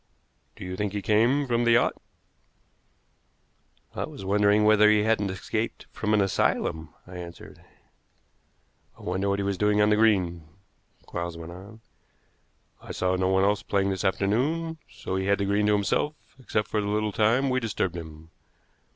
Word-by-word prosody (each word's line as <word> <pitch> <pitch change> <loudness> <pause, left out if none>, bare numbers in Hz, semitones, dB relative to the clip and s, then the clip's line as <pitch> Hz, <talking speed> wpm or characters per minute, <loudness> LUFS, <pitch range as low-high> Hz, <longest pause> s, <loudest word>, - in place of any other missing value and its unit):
"Do - - -9
you 90 0 -5
think 105 +1 -2
he 100 -1 -3
came 120 +7 +3
from 120 -2 0
the 120 0 +4
yacht?" 120 - +3 2.0
"I - - -3
was 95 - -10
wondering 105 +1 +3
whether 105 0 +6
he 105 -1 +4
hadn't 110 -2 +1
escaped 110 +4 -4
from 105 0 0
an 105 - +3
asylum," 80 -4 0
I 90 0 -10
answered. 85 -1 -10 1.3
"I - - -15
wonder 95 +3 -1
what 100 - +1
he 100 - -2
was 100 -1 -2
doing 105 0 +2
on 105 0 +4
the - - +5
green," 90 -7 +2 0.6
Quarles 85 -1 -5
went 85 0 -8
on. 100 +5 -12 1.0
"I - - -9
saw 95 0 0
no 95 0 0
one 95 0 +2
else 100 +1 +2
playing 100 -1 0
this 95 0 -3
afternoon, 140 +13 0
so 95 - -5
he 95 0 -2
had 100 0 +3
the 100 - -1
green 100 +1 +1
to 105 - +4
himself, 105 +9 0 0.2
except 105 -4 -2
for 105 - 0
the 100 - -3
little 105 +1 0
time 120 +6 +2
we 130 - +2
disturbed 100 -6 -2
him. 80 -1 -10
100 Hz, 175 wpm, -26 LUFS, 95-110 Hz, 2.0 s, whether